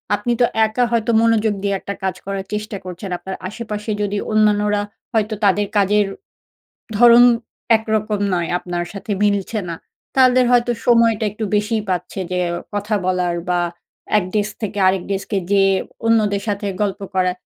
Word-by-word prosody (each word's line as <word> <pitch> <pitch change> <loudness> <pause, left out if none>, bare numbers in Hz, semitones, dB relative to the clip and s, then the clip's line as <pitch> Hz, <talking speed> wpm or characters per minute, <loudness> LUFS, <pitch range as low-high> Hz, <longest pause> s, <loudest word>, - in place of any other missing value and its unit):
আপনি 210 +4 -2
তো - - +7 0.2
একা 220 +3 0
হয়তো 235 0 +1
মনোযোগ 225 -2 +2
দিয়ে 200 -1 0
একটা 200 - -5
কাজ 190 -2 -1
করার 195 0 -4
চেষ্টা 210 0 -3
করছেন। 180 +2 -7
আপনার 190 +1 -6
আশেপাশে 210 0 -5
যদি 205 0 -1
অন্যান্যরা 210 -1 +2 0.3
হয়তো 220 -1 +1
তাদের 200 +1 +3
কাজের 205 +1 +3 0.9
ধরন 240 +2 +8 0.5
একরকম 215 -1 -1
নয়, 170 -2 -1
আপনার 175 -1 -4
সাথে 205 +1 -5
মিলছে 205 +1 +1
না। 170 - -3 0.4
তাদের 255 -1 +5
হয়তো 240 0 +3
সময়টা 230 -2 +4
একটু 215 +2 -5
বেশিই 210 +1 0
পাচ্ছে 180 +1 -3
যে 180 - 0 0.4
কথা 205 +1 -1
বলার 180 -2 0
বা 180 -1 +2 0.6
১ 200 - -1
ডেস্ক 210 0 0
থেকে 205 -1 -3
আরেক 185 -1 +2
ডেস্কে 195 +1 -2
যেয়ে 195 -1 +4 0.3
অন্যদের 210 -3 +2
সাথে 205 0 -2 0.2
গল্প 200 -2 -1
করা। 185 -1 +2
205 Hz, 155 wpm, -19 LUFS, 195-220 Hz, 0.9 s, ধরন